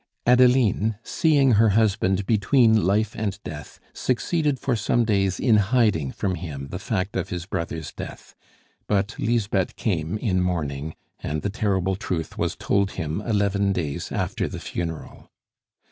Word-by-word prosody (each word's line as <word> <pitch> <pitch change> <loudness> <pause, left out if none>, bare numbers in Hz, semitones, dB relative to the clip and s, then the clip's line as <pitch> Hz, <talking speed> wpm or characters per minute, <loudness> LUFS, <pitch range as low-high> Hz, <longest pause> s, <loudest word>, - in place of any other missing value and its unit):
Adeline, 125 -3 +4
seeing 145 -5 +3
her 110 0 +5
husband 100 -3 +2
between 110 - +3
life 105 +2 +1
and 100 -2 -3
death, 75 -1 -8
succeeded 145 +3 0
for 130 - 0
some 115 +2 +1
days 100 -3 +1
in 115 -4 +4
hiding 105 - +2
from 95 - -2
him 75 -5 -6
the 90 - -5
fact 100 -1 -2
of 95 - -2
his 85 -1 -4
brother's 80 -3 -4
death; - - -9 0.5
but 100 +1 0
Lisbeth 105 -5 0
came, 85 -3 -1
in 95 -5 0
mourning, 80 -4 -2 0.2
and 75 0 -3
the 100 - -1
terrible 95 -3 0
truth 90 -6 -4
was - - -1
told 100 -1 0
him 80 +5 -3
eleven 100 -2 +1
days 75 -6 -3
after - - -1
the - - -6
funeral. 80 -2 -6
100 Hz, 145 wpm, -24 LUFS, 90-110 Hz, 0.5 s, her